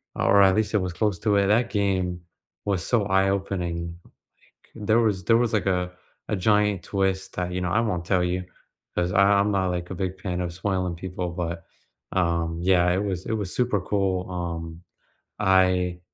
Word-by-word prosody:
or 100 - +4
at 95 -1 +5
least 110 0 0
it - - +4
was 90 -2 -3
close 105 0 0
to 105 -2 +2
it. 100 - +3
That 115 +3 +3
game 95 -4 0 0.4
was 95 -5 -1
so 115 -5 +1
eye-opening, 95 -3 -1 0.6
like, 105 - -12
there 110 +2 +4
was 105 -5 +1
there 115 0 +5
was, 120 -1 +1
like, 105 - +1
a 90 -1 0 0.4
a 105 - +1
giant 105 0 +2
twist 95 -1 -1
that, 90 -1 -2
you 90 - -2
know 90 - -1
I 115 - +3
won't 90 -7 -2
tell 90 -1 +2
you, 90 +1 -1 0.5
'cause 90 0 0
I 100 - +5 0.2
I'm 100 +1 +2
not, 95 -2 +1
like, 90 0 -3
a 95 - -4
big 95 0 -3
fan 90 -2 -2
of 85 -2 -3
spoiling 90 -2 -2
people 90 0 -4
but, 85 -1 -4 0.5
um, 85 -2 0
yeah, 90 -1 +3
it 95 +3 0
was 95 -3 -3
it - - -1
was 100 -4 -3
super 120 -6 +1
cool. 95 -2 -1
Um, 85 -1 -5 0.6
I 90 -1 +2
95 Hz, 195 wpm, -25 LUFS, 90-100 Hz, 0.6 s, at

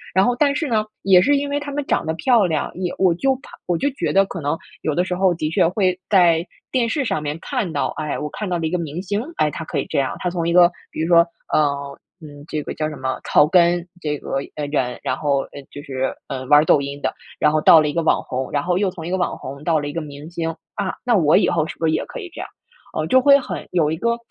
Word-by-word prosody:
然 190 - +5
后 245 - +2
但 280 +2 +2
是 300 +1 -1
呢， 220 -4 +1 0.2
也 190 -2 +6
是 285 +8 +3
因 285 0 -2
为 285 - 0
他 290 0 -6
们 290 +1 -2
长 - - 0
得 160 - -1
漂 230 +4 +3
亮， 160 -4 -1
也 180 -1 -3
我 185 -3 +4
就 270 +8 +1
怕 270 - -16 0.2
我 175 - 0
就 280 - +1
觉 280 - -2
得 195 - +5
可 185 - -6
能 145 +2 0 0.3
有 155 - -1
的 175 - +1
时 180 0 -2
候 185 0 +3
的 155 -2 -2
确 165 - +3
会 185 0 0
在 175 -4 +4 0.3
电 245 -3 +1
视 280 +5 -1
上 190 -11 -1
面 150 +1 -3
看 245 - -2
到， - - 0
哎， 150 -1 -2
我 150 - -4
看 210 - -5
到 175 -2 -1
了 160 - -1
一 - - -2
个 180 - 0
明 165 0 -4
星， 205 +2 -2 0.2
哎， 150 - +2
他 160 +2 -6
可 - - -2
以 - - -2
这 - - -2
样， 135 -1 0
他 180 - -1
从 170 -2 -2
一 170 - +1
个 175 0 +6 0.2
比 - - -4
如 160 - 0
说， 170 -1 +6 0.3
呃， 155 -1 +4 0.5
嗯， 145 -2 -12
这 155 - -3
个 - - -6
叫 155 0 -1
什 155 - -7
么 130 -1 -3
草 145 - +4
根， 175 0 +3
这 150 -2 -2
个 - - -5 0.2
嗯， 150 -1 -4
人， 130 -4 -1
然 130 - -2
后， 140 -2 +1
呃， - - -9
就 145 - -8
是， 135 -3 -3
嗯， 130 -2 -5
玩 150 +1 +6
抖 150 - +5
音 140 +1 -5
的， - - 0 0.3
然 150 - +4
后 155 - +2
到 160 +1 +7
了 150 - 0
一 - - -4
个 170 - 0
网 - - +2
红， 130 +1 -4
然 145 - 0
后 175 +3 0
又 195 -1 +1
从 165 -3 -8
一 - - -4
个 185 - 0
网 180 - -1
红 140 +2 -8
到 160 -1 +2
了 145 - -4
一 145 - -5
个 170 - -2
明 150 0 -9
星。 165 -1 -3 0.2
啊， 200 -2 -2
那 245 -2 +2
我 160 -3 +4
以 - - +3
后 160 -3 +1
是 - - -7
不 165 - 0
是 - - +2
也 - - 0
可 - - -8
以 380 -6 -7
这 - - -9
样？ - - -6 0.5
嗯， - - -1
就 260 - +5
会 280 +1 +6
很 265 - -6
有 160 -4 +2
一 - - 0
个 235 +5 0
170 Hz, 310 characters per minute, -21 LUFS, 150-195 Hz, 0.5 s, 到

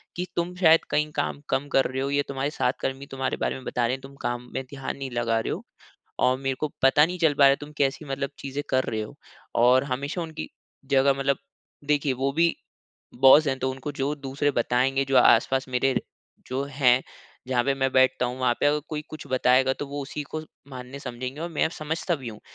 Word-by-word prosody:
कि 180 - -2
तुम 175 +1 -1
शायद 165 -3 +5
कहीं 150 0 +1
काम 145 - -2
कम 140 +2 0
कर 135 - +4
रहे 130 0 -2
हो 140 - -1
या 145 0 +2
तुम्हारे 140 +1 -2
साथ 130 -4 0
कर्मी 135 +1 -3
तुम्हारे 130 0 -2
बारे - - 0
में 130 - -9
बता 120 - 0
रहे 120 +2 0
हैं 135 - -12
तुम 135 +1 -12
काम 120 0 -3
में 130 - -2
ध्यान 135 0 -6
नहीं 135 -2 -5
लगा 115 -1 0
रहे - - -2
हो - - -6 0.6
और 130 0 +3
मेरे 135 -1 -1
को 155 - 0 0.2
पता 145 +3 +6
नहीं 180 +1 -4
चल 160 -3 +4
पा 140 - +3
रहा 135 - +9
है 135 - +4
तुम 150 +1 -8
कैसी 140 +2 0
मतलब 140 0 -2
चीज़ें 140 +1 -4
कर 130 0 +2
रहे 110 -1 -2
हो। 110 +6 -8 0.5
और 130 +2 +5
हमेशा 140 +7 -3
उनकी 160 -1 -6 0.5
जगह 135 +1 +5
मतलब 135 0 +1 0.6
देखिए 145 -2 +1
वो 135 +2 -1
भी 170 +2 +3 0.7
बॉस 145 +3 +8
हैं, 135 -1 0
तो 130 - 0
उनको 135 +3 -6
जो 140 +1 -1
दूसरे 140 +1 -1
बताएँगे 130 +2 +1
जो 135 -1 +2
आस-पास 130 +3 +4
मेरे 130 +1 +1 0.5
जो 130 +2 -2
हैं, 130 -3 +3 0.5
जहाँ 125 -2 +1
पे 140 - +2
मैं 135 -1 0
बैठता 130 -1 +4
हूँ 125 +1 -6
वहाँ 125 -1 +3
पे - - +1
अगर 150 +1 +3
कोई 150 -1 -3
कुछ 155 - -8
बताएगा 130 +1 +4
तो 145 - -4
वो 145 +1 -5
उसी 145 +2 -5
को 155 - -3 0.3
मानने 130 +2 -8
समझेंगे 130 +3 -6
और 170 - -3
मैं 160 - +1
समझता 160 +2 -1
भी 130 -5 -7
हूँ। 105 -1 -11
135 Hz, 225 wpm, -25 LUFS, 130-145 Hz, 0.7 s, रहा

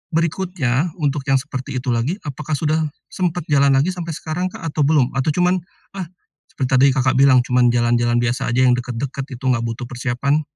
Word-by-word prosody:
berikutnya, 165 -4 0
untuk 145 -3 -1
yang 135 - +4
seperti 130 0 -5
itu 125 0 -2
lagi, 120 +9 0
apakah 150 +1 -3
sudah 155 +1 0 0.3
sempat 180 -3 -1
jalan 140 -1 +4
lagi 150 +7 +2
sampai 175 -2 -6
sekarang 165 +5 -3
Kak, - - -11
atau 155 - 0
belum? 145 -5 +3
Atau 135 +3 0
cuman, 180 +1 +2 0.3
ah 190 -3 -5 0.4
seperti 130 -2 -3
tadi 130 +1 +6
Kakak 130 0 +2
bilang, 130 -3 +6
cuman 125 -1 +3
jalan-jalan 120 0 +2
biasa 120 +1 0
aja 130 - +4
yang 125 - +5
dekat-dekat 125 +2 -4
itu, 125 - -15
enggak 125 -2 +2
butuh 115 +2 -4
persiapan, 130 +4 -1
135 Hz, 190 wpm, -20 LUFS, 125-155 Hz, 0.4 s, tadi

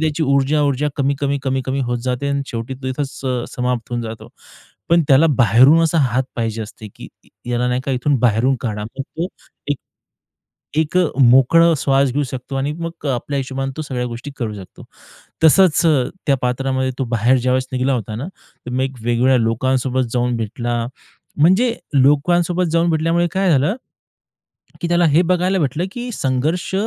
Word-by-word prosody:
त्याची 160 0 0
ऊर्जा 140 +1 +2
ऊर्जा 145 +1 0
कमी-कमी, 140 0 0
कमी-कमी 135 0 -1
होत 120 -1 -1
जाते 130 +2 -2
आणि 140 0 -1
शेवटी 115 +3 -5
तो 130 0 -9
तिथंच 135 +1 -4
अ, 125 -2 -1
समाप्त 125 -1 -2
होऊन 120 -1 -2
जातो. 110 0 -8 0.6
पण 170 0 +4
त्याला 140 +4 +6
बाहेरून 130 +7 +5
असा 165 0 +1
हात 130 -2 +2
पाहिजे 115 -1 -2
असते, 105 0 -10
की - - -10 0.4
याला 120 +1 0
नाही 125 +1 0
का 140 - -2
इथून 135 +2 +1
बाहेरून 120 +3 +2
काढा. 105 -3 -3
मग 135 +5 -6
तो 165 +6 -5 0.4
एक 145 - -1 1.0
एक 160 +3 0
अ, 180 - +4 0.2
मोकळा 135 +7 +5
श्वास 135 -1 +2
घेऊ 145 +2 0
शकतो 130 +1 -7
आणि 140 +2 -1
मग 165 -2 -6
आपल्या 135 +2 -2
हिशोबाने 135 0 -3
तो 155 - -3
सगळ्या 125 -4 -3
गोष्टी 120 +4 -7
करू 110 -4 -3
शकतो. 95 -3 -12 0.6
तसंच 175 +1 +5 0.5
त्या 140 -2 +3
पात्रामध्ये 130 +1 -1
तो 135 - 0
बाहेर 120 +4 +3
ज्यावेळेस 130 +1 0
निघाला 130 +1 0
होता 110 -3 -3
ना, 135 +8 -5 0.4
मग 130 +1 -1
एक 135 -1 -3
वेगवेगळ्या 120 +3 +2
लोकांसोबत 130 +2 0
जाऊन 125 -1 0
भेटला, 120 +2 -3 0.6
म्हणजे 190 +11 +3 0.2
लोकांसोबत 170 +6 +3
जाऊन 170 0 +2
भेटल्यामुळे 165 +2 +1
काय 190 -1 +1
झालं, 150 +7 +2 1.1
की 170 - -1
त्याला 175 0 +3
हे 155 +3 +4
बघायला 185 +2 +1
भेटलं 155 +4 -1
की 245 0 -6
संघर्ष 150 +8 -1
135 Hz, 170 wpm, -19 LUFS, 125-155 Hz, 1.1 s, त्याला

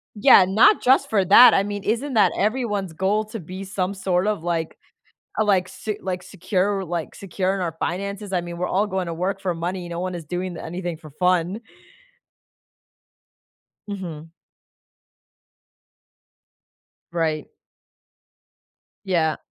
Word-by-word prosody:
Yeah, 205 -3 +7
not 225 - +5
just 270 +2 +3
for 200 -3 +2
that. 220 +7 +9
I 195 - +3
mean, 205 -1 -5
isn't 245 +7 -1
that 195 -6 +5
everyone's 210 -4 -1
goal 195 +5 +1
to 215 +1 -7
be 185 +3 -8
some 190 -1 -2
sort 185 0 0
of 210 -6 -1
like 165 -2 -2 0.6
uh, - - +4
like 185 -3 +2
s - - -14
like 180 -1 -3
secure 190 +1 -1
like 170 -1 -4
secure 190 0 -2
in 195 - -3
our 170 -3 -3
finances? 200 +2 -3
I 180 - +1
mean, 170 0 -7
we're 180 +1 -1
all 205 +3 +1
going 190 -2 -2
to 170 - -3
work 190 +4 -2
for 180 -3 -1
money, 175 +1 -4
no 170 0 -4
one 185 0 -3
is 170 - -6
doing 180 +2 -4
anything 175 0 -5
for 155 -1 -13
fun. 180 +5 0 2.3
Mhm. 165 -6 -7 2.8
Right. 160 -3 -2 1.5
Yeah. 165 -5 +1
185 Hz, 140 wpm, -23 LUFS, 175-200 Hz, 2.8 s, that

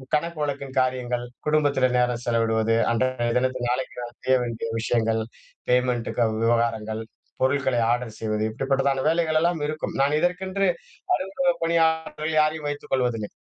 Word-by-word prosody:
கணக்கு 165 +1 -2
வழக்கின் 140 -2 -4
காரியங்கள், 125 -1 -1 0.2
குடும்பத்தில 145 -4 +3
நேரம் 125 -1 +1
செலவிடுவது, 115 -1 +2 0.2
அன்றைய 120 0 0
தினத்தில 130 -1 0
நாளைக்கு 125 0 -2
நான் 120 +1 -13
செய்ய 130 0 +4
வேண்டிய 115 -1 -4
விஷயங்கள், 115 -1 +1 0.5
பேமெண்டு 125 -2 +1
கு - - +2
க 115 - +4 0.2
விவகாரங்கள், 115 -2 +1 0.4
பொருட்களை 130 -1 +2
ஆர்டர் 120 -2 -2
செய்வது 110 -1 -1
இப்டிப்பட்டதான 135 +2 0
வேலைகள் 160 -1 +2
எல்லாம் 170 -2 +1
இருக்கும். 155 0 -4
நான் 145 +2 +3
இதற்கென்று 190 +2 0 0.5
அலுவலக 255 +8 0
பணியாளர்கள் 160 -1 +1
யாரையும் 155 -1 0
வைத்துக் 145 - -7
கொள்வதில்லை. 120 -5 0
130 Hz, 140 wpm, -24 LUFS, 120-155 Hz, 0.5 s, செய்ய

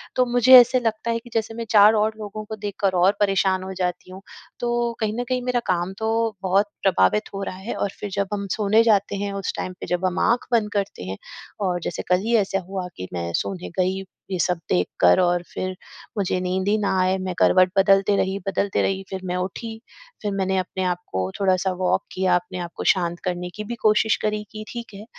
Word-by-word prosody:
तो 255 - +3
मुझे 245 +1 +5
ऐसा 245 +1 +4
लगता 225 +1 -1
है 230 - -1
कि 240 - -15
जैसे 225 -1 -1
मैं 230 0 -5
4 210 0 +7
और 215 0 +2
लोगों 215 0 -6
को 220 +1 -6
देखकर 200 -2 -2
और 185 +3 +4
परेशान 195 -2 +2
हो 190 0 -6
जाती 180 0 -3
हूँ, 190 - -10 0.4
तो 240 -1 0
कहीं 215 -1 0
न 245 - 0
कहीं 255 -1 0
मेरा 250 -1 +1
काम 180 +1 0
तो 220 0 0 0.3
बहुत 195 +2 +3 0.2
प्रभावित 105 - +2
हो 195 0 -4
रहा 185 - -5
है 195 +5 -5
और 200 - -1
फिर 205 - -4
जब 200 0 0
हम 200 -1 -3
सोने 215 +3 +3
जाते 205 -3 +2
हैं 200 0 -3
उस 195 -1 -3
टाइम 185 - -4
पे, - - -5
जब 180 +1 -1
हम 180 - 0
आँख 240 +1 +2
बंद 220 -3 +2
करते 200 - -2
हैं 95 +1 -5 0.5
और 180 -1 0
जैसे - - -4
कल 180 - +5
ही 235 +1 +2
ऐसे 195 -1 +1
हुआ 185 0 -5
कि 90 - -6
मैं 85 -1 -3
सोने 185 -2 -3
गई, 190 +1 0 0.3
ये 185 - -1
सब 180 0 +1
देख 90 0 +2
कर 90 0 +6
और 175 -1 +2
फिर 185 0 -3 0.4
मुझे 185 -2 0
नींद 185 +1 -1
ही 210 - +3
ना 205 -2 0
आए। 185 +1 +2
मैं 185 -1 -3
करवट 185 0 +5
बदलती 195 +1 +4
रही, 190 +1 0
बदलती 195 0 0
रही, 195 0 -1
फिर 190 -1 -5
मैं 180 0 -2
उठी, 220 +5 -5 0.4
फिर 205 - -2
मैंने 190 -1 0
अपने 185 0 -2
आप 180 -1 0
को 95 0 -2
थोड़ा-सा 190 -1 +2
वॉक 180 0 0
किया, 185 -1 +2
अपने 180 +1 -3
आप 175 -1 -5
को - - -5
शांत 175 -2 -3
करने 180 -1 -3
की 210 - -5
भी 235 +3 -5
कोशिश 215 +1 +4
करी 210 0 -1
कि 215 0 -7
ठीक 235 -3 -7
है 200 - -9
195 Hz, 230 wpm, -23 LUFS, 185-215 Hz, 0.5 s, 4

